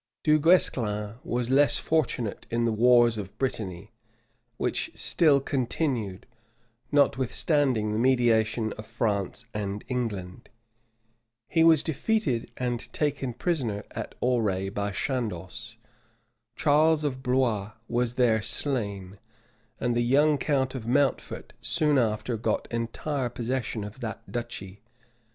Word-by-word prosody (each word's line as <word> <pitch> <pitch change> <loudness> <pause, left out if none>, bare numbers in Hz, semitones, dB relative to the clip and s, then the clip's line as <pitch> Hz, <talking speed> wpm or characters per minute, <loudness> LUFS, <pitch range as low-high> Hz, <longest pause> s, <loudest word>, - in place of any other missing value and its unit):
Du 155 0 +4
Guesclin 115 - +2
was 120 +1 -2
less 140 +2 +5
fortunate 130 -9 -1
in 115 0 0
the 115 - +2
wars 120 0 +4
of 100 -1 -8
Brittany, 105 -6 -3 0.7
which - - -1
still 150 -5 +3
continued, 125 - -2 0.7
notwithstanding 135 -3 +2
the 110 - 0
mediation 115 -3 +2
of 105 - -8
France 110 -1 -2
and 100 -1 -3
England: 105 -8 -4 1.0
he 165 - +3
was 160 -3 +6
defeated 160 - 0
and 120 -2 -2
taken 140 -4 -1
prisoner 120 - -2
at - - -6
Auray 105 -6 +1
by 100 0 -1
Chandos: 110 0 -4 0.8
Charles 155 +1 +3
of 130 -3 -2
Blois 120 -6 0
was 120 0 -1
there 115 -4 +3
slain, 100 -8 -2 0.6
and 120 -1 0
the 120 - +2
young 145 +4 +3
count 130 -2 0
of 120 -4 -6
Mountfort 135 +2 0
soon 150 -4 +2
after 115 0 0
got 110 - -1
entire 120 +3 -2
possession 120 -2 -3
of 105 +5 -9
that 110 -3 -6
duchy. 100 -5 -6
120 Hz, 120 wpm, -27 LUFS, 110-135 Hz, 1.0 s, was